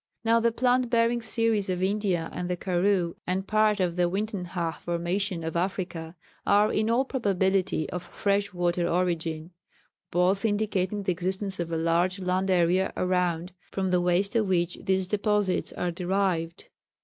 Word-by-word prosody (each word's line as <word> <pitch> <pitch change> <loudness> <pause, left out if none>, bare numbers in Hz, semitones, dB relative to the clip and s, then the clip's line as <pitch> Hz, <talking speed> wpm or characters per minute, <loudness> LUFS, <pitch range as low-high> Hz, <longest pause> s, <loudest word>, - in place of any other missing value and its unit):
Now 230 0 +4
the 230 0 +2
plant 250 +1 +1
bearing 235 0 +2
series 225 -3 +1
of 185 0 -1
India 190 -4 0
and 180 0 -4
the 180 - -1
Karoo 180 -1 +1
and 185 +2 -1
part 215 0 +2
of 180 -2 0
the 175 -1 +2
Uitenhage 180 -4 -3
formation 175 +1 -1
of 160 0 -4
Africa 175 -2 -3 0.3
are 205 +1 +4
in 215 +1 +1
all 245 +4 +2
probability 190 - 0
of 180 - -3
fresh 200 +3 -1
water 175 -1 0
origin, 165 -2 -1 0.6
both 185 +4 +2
indicating 205 -2 0
the 190 - +1
existence 190 +2 0
of 170 -1 -3
a 165 - 0
large 170 +3 +1
land 185 0 -1
area 180 +1 +2
around, 180 -1 0 0.2
from 190 -1 -2
the 180 -1 +3
waste 180 +4 +1
of 220 -3 +2
which 175 -1 0
these 190 0 +1
deposits 205 -1 0
are 180 - -2
derived. 180 -1 -1
185 Hz, 160 wpm, -27 LUFS, 175-205 Hz, 0.6 s, Now